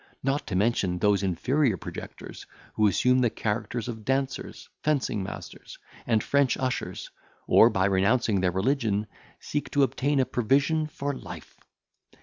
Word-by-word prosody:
Not 135 +2 -1
to 95 - -3
mention 95 -3 +1
those 100 +1 +2
inferior 110 - +1
projectors, - - -9 0.3
who 110 - +3
assume 125 +6 +3
the 120 -2 +3
characters 110 +2 -3
of 110 -3 -6
dancers, 135 +2 -2
fencing 140 -8 0
masters, 95 - -8 0.3
and 110 -3 +2
French 140 -3 +2
ushers, 130 -1 -3 0.3
or, - - +6
by 95 0 +1
renouncing 100 +1 +2
their 90 - +2
religion, 105 +2 0 0.3
seek 145 - -3
to 145 - +2
obtain 140 +1 +1
a 130 - +3
provision 140 +6 +1
for 145 -1 -4
life. - - -10
120 Hz, 140 wpm, -27 LUFS, 100-135 Hz, 0.3 s, or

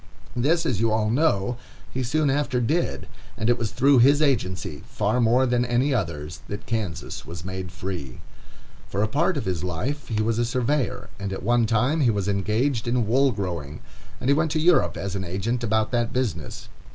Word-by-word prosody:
This, 155 +8 +2
as 115 -7 0
you 115 0 +2
all 110 0 +1
know, 120 -5 +1 0.4
he 130 - -1
soon 145 +3 +1
after 135 -3 0
did; 150 +9 -1 0.3
and 110 +2 +2
it 120 - +2
was 115 -2 -1
through 135 +2 +4
his 140 +4 +6
agency, 95 - 0
far 125 - 0
more 120 +3 +4
than 120 -1 +2
any 125 +4 +1
other's, 80 - -3
that 100 0 -6
Kansas 105 -8 -3
was 85 +1 -8
made 95 -2 -5
free. 90 -8 -6 0.7
For 100 - -1
a - - +2
part 150 +8 +1
of 140 - -3
his 90 -3 -2
life 125 - -3
he 110 -2 0
was 115 +1 0
a - - +3
surveyor, 125 0 -1
and 100 -1 -3
at 95 - -5
one 120 +1 +3
time 125 +8 +2
he 125 - +4
was 100 -3 0
engaged 110 +5 0
in 120 -1 +1
wool 135 +5 +3
growing, 85 - -4 0.4
and - - -4
he 140 - +6
went 155 +2 +1
to 155 - +1
Europe 170 +1 +3
as 100 -1 -4
an 95 - -2
agent 100 +7 -2
about 110 -1 +1
that 120 -2 0
business. 110 - -3
115 Hz, 200 wpm, -24 LUFS, 100-130 Hz, 0.7 s, his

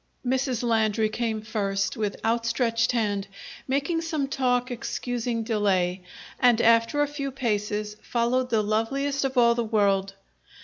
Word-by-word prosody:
Mrs. 255 -1 0
Landry 220 -2 +2
came 220 -1 -2
first, 195 -3 -1
with 210 -2 -3
outstretched 230 0 +1
hand, 205 -4 -1 0.4
making 280 +5 0
some 315 -4 -2
talk 250 -2 0
excusing 240 -1 -3
delay; 195 -5 0 0.4
and, 245 -2 +4
after 230 +6 +4
a - - 0
few 280 -1 -4
paces, 210 -4 -2
followed 250 +2 0
the 220 -3 +2
loveliest 270 +7 0
of 265 -1 -3
all 235 -1 +6
the 235 0 -1
world. 200 -3 +1
230 Hz, 135 wpm, -26 LUFS, 215-255 Hz, 0.4 s, all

